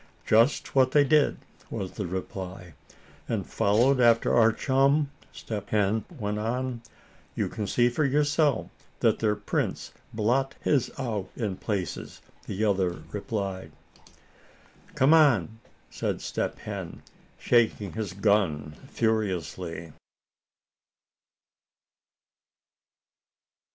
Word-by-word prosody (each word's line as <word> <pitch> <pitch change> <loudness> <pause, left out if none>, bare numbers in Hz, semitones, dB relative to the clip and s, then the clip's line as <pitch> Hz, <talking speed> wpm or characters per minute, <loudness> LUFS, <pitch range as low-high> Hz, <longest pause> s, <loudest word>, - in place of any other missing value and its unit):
"Just 115 +6 +3
what 130 -1 +4
they 145 - +6
did," 150 0 +3 0.3
was 100 -5 -4
the 100 -4 -4
reply. 90 -1 -6 0.6
"And - - -1
followed 120 +7 +2
after 115 -2 +4
our 115 -1 +5
chum?" 140 +4 +2 0.2
Step 105 -3 -6
Hen 105 +1 +1
went 105 -2 -2
on. 120 +2 -2 0.5
"You - - 0
can 105 -3 -4
see 120 +3 +3
for 125 +5 0
yourself 145 -2 +1 0.3
that - - +3
their 105 -1 +1
prints 105 0 -3 0.2
blot 125 +5 0
his 140 -5 +1
out 110 -8 -3
in 105 -6 -2
places," 100 -5 -4 0.3
the 105 +3 -1
other 95 -6 0
replied. 100 -5 -4 1.2
"Come 135 +4 +5
on!" 115 - +4 0.3
said - - -2
Step - - -3
Hen, - - -7 0.3
shaking 115 -4 +1
his 110 -5 -4
gun 95 -7 +1 0.2
furiously. 90 - -2
110 Hz, 105 wpm, -27 LUFS, 95-130 Hz, 1.2 s, they